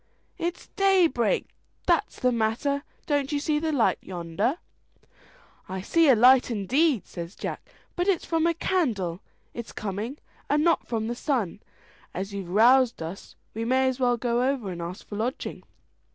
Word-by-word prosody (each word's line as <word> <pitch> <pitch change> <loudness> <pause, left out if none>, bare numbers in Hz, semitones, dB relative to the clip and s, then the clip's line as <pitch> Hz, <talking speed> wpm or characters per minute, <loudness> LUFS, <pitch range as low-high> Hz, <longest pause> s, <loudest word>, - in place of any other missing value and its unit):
"It's 345 +1 -4
daybreak 360 - +3 0.4
that's 340 -3 +1
the 250 - +2
matter: 235 +5 0 0.2
don't 285 -2 0
you 290 - 0
see 300 +1 0
light 300 -7 +1
yonder?" 185 - -2 1.1
"I 190 0 -4
see 325 - +3
a 260 - +7
light 255 +3 +6
indeed," 245 - +1
says 170 +2 -8
Jack, - - -6 0.3
"but 355 +1 -1
it's 380 -5 +1
from 330 0 +1
a 335 - +1
candle 215 - -1 0.3
it's 235 -1 -7
coming, 215 +7 -4 0.3
and 295 +1 +3
not 335 0 +2
from 225 -2 -2
the 235 - -2
sun. 240 - -1 0.6
As 195 +2 -4
you've 195 -3 -5
roused 235 +2 +4
us 170 +5 -8 0.2
we 225 - -3
may 260 +3 +2
as 260 0 -1
well 245 -2 +2
go 240 0 0
over, 245 -9 -2
and 170 -1 -6
ask 175 +2 -6
for 205 - -7
lodging." 240 +5 -3
245 Hz, 160 wpm, -26 LUFS, 205-295 Hz, 1.1 s, a